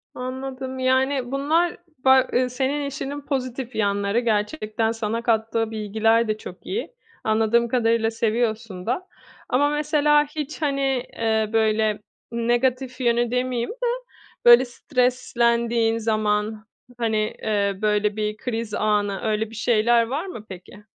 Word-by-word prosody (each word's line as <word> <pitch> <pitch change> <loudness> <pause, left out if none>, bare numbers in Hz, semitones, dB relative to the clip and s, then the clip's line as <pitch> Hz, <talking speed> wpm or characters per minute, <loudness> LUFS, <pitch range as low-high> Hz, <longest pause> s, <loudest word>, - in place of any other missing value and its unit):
Anladım. 260 +1 -5
Yani, 260 0 +1
bunlar 320 +6 +1 0.3
ba 265 -1 +6
ııı, 250 0 +2
senin 275 +3 -1
işinin 280 +1 -5
pozitif 255 -2 -4
yanları. 200 +1 +1
Gerçekten 220 0 0
sana 225 0 -2
kattığı 225 -1 0
bilgiler 220 +2 +1
de 215 0 -1
çok 185 - -11
iyi. 455 +4 -4 0.3
Anladığım 225 +2 +2
kadarıyla 230 -2 +1
seviyorsun 225 -4 -1
da. 310 +11 -2 0.4
Ama 285 +3 +3
mesela 295 0 +3
hiç, 300 +1 -6
hani, 275 -2 0 0.4
eee, 220 -1 +1
böyle, 220 -1 +2 0.3
negatif 250 +2 0
yönü 240 -1 +2
demeyeyim 250 -1 -1
de, - - -4 0.6
böyle, 240 +2 +9
streslendiğin 235 -3 +1
zaman, 215 -1 -1 0.3
hani, 225 -2 0 0.3
eee, 200 -2 0
böyle, 210 -1 +1
bir 215 0 -2
kriz 225 -3 -4
anı 205 -2 0
öyle 220 0 -1
bir 225 - -11
şeyler 235 +1 +3
var 285 +8 -3
mı 230 - -8
peki? 190 +3 -11
235 Hz, 130 wpm, -23 LUFS, 215-260 Hz, 0.6 s, böyle